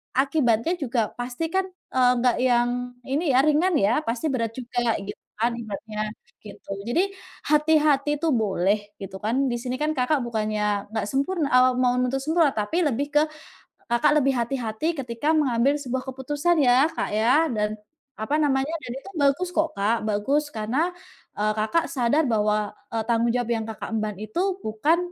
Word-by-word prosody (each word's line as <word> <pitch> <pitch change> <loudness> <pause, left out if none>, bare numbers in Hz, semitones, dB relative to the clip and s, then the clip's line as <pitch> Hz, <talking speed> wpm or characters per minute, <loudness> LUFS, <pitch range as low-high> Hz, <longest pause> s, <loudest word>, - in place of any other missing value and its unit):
akibatnya 270 0 +2
juga 235 -4 0
pasti 245 +6 -3
kan, 380 0 +2 0.3
eee, 250 -1 +4
nggak 245 0 +2
yang 245 -1 +3 0.4
ini 280 +6 -1
ya, 255 - +5
ringan 320 +4 +3
ya, 200 +9 +3
pasti 230 +4 -2
berat 230 -3 0
juga 240 -2 -1
gitu 205 - -7 0.2
kan 235 +2 +1
ibaratnya, 215 0 -5 0.4
gitu. 200 -1 -11 0.2
Jadi, 320 +9 +2 0.5
hati-hati 300 -2 +3
itu 330 - -2
boleh 205 -2 +1 0.2
gitu 195 0 -7
kan, 225 +3 0 0.2
di 240 - -1
sini 250 0 -3
kan 305 - +1
Kakak 260 +4 +2
bukannya 210 -3 -1
nggak 220 -2 -2
sempurn 300 +5 0
eee, 255 -1 +5
mau 250 -1 +3
nuntut 255 +2 0
sempurna, 320 0 +3
tapi 270 +12 0
lebih 280 +2 -1
ke 295 - +5 0.7
Kakak 240 +4 +3
lebih 270 0 +2
hati-hati 235 +2 -2 0.2
ketika 245 +6 -1
mengambil 270 -1 +2
sebuah 260 -1 -3
keputusan 290 +6 0
ya 255 +3 +5
Kak - - -2
ya, 255 +9 +3
dan, 210 -1 0 0.5
apa 220 +7 -2
namanya, 280 -1 +1
dan 240 - -6
itu 390 - -11
bagus 285 +6 +2
kok 320 0 +2
Kak, 215 +2 0
bagus. 270 +9 +1
Karena, 260 +12 0 0.5
eee, 210 +1 +1
Kakak 320 +10 +1
sadar 275 +1 +2
bahwa, 210 -1 +1 0.2
e - - -3
tanggung 235 0 +2
jawab 245 -2 -1
yang 225 -2 0
Kakak 220 - -6
emban 215 -1 -1
itu 215 +10 -4 0.2
bukan, 220 +11 +1
250 Hz, 165 wpm, -24 LUFS, 220-290 Hz, 0.7 s, ya